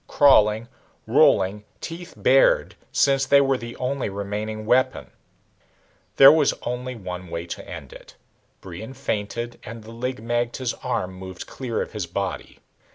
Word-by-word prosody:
Crawling, 110 -5 +4 0.4
rolling, 100 +3 +3 0.2
teeth 170 +2 -8
bared, - - +4 0.2
since 135 -1 +2
they 140 - +6
were 135 -1 +3
the 120 -1 -7
only 130 -2 -2
remaining 105 +2 -4
weapon. 125 +3 +1 1.0
There 135 +1 +10
was 155 -2 +3
only 125 +1 -4
one 90 -4 -7
way 85 0 -5
to 85 - -8
end - - -9
it. - - -14 0.5
Brion 100 +8 -9
feinted 120 -1 -4
and 115 0 -9
the 110 - -11
Lig 125 +2 -4
magte's 120 +2 -2
arm 95 0 -2
moved 95 -1 -8
clear 125 -4 -3
of - - -11
his 105 -5 -4
body. 95 +2 -4
115 Hz, 145 wpm, -23 LUFS, 100-130 Hz, 1.0 s, There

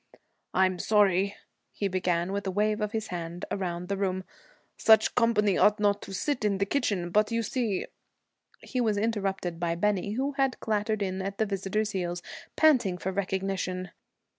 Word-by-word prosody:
'I'm 185 -1 +3
sorry,' 200 -2 +3 0.4
he 200 - -2
began, 180 -1 0
with 200 0 -3
a - - +1
wave 210 +3 +1
of 210 -1 -1
his 220 -1 -3
hand 170 0 -5
around 180 -2 -3
the 200 - -1
room. 190 -1 -1 0.5
'Such 220 -1 +5
company 210 -5 +3
ought 210 0 +4
not 205 -1 +2
to - - -9
sit 240 +7 -1
in 205 -2 +2
the 200 - +1
kitchen, 195 -8 -1
but 210 +3 +3
you 230 0 0
see 220 -4 -1 0.4
' - - -53 0.3
He 255 - -2
was 215 -3 +1
interrupted 195 -5 -1
by 170 -1 0
Bennie, 200 +2 0
who 270 +5 -1
had 270 -2 0
clattered 215 -1 0
in 190 0 -2
at 195 +1 -4
the 220 - +2
visitor's 200 +2 -1
heels, 175 -3 -3 0.3
panting 250 - +4
for 190 +1 -3
recognition. 190 -1 -2
200 Hz, 175 wpm, -28 LUFS, 185-215 Hz, 0.5 s, Such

